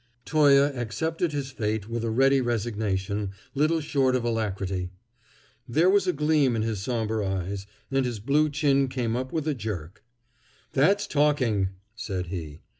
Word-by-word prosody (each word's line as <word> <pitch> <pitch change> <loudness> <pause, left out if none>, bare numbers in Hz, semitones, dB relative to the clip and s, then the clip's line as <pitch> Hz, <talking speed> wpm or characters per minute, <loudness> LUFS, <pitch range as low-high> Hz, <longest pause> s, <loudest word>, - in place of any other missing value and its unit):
Toye 145 -3 +5 0.2
accepted 160 - -2
his 140 -2 -3
fate 110 -3 -2
with 115 0 -3
a 115 - -1
ready 135 +4 +4
resignation, 105 -4 -2 0.2
little 155 +4 +2
short 135 -4 +1
of 125 - 0
alacrity. 100 -5 -2 0.8
There 165 +9 +4
was 200 -2 +3
a - - +4
gleam 150 -4 +2
in 110 - 0
his 110 -3 -2
somber 110 -1 -1
eyes, 95 +1 -3 0.2
and 135 0 +2
his 120 -4 -3
blue 145 +7 +2
chin 140 -2 +2
came 125 -3 -2
up 130 +1 -3
with 160 -1 -2
a 155 - +2
jerk. 100 - -6 0.7
"That's 195 +9 +3
talking!" 130 -10 +2 0.3
said 95 -6 -4
he. 80 -5 -6
120 Hz, 155 wpm, -26 LUFS, 105-145 Hz, 0.8 s, Toye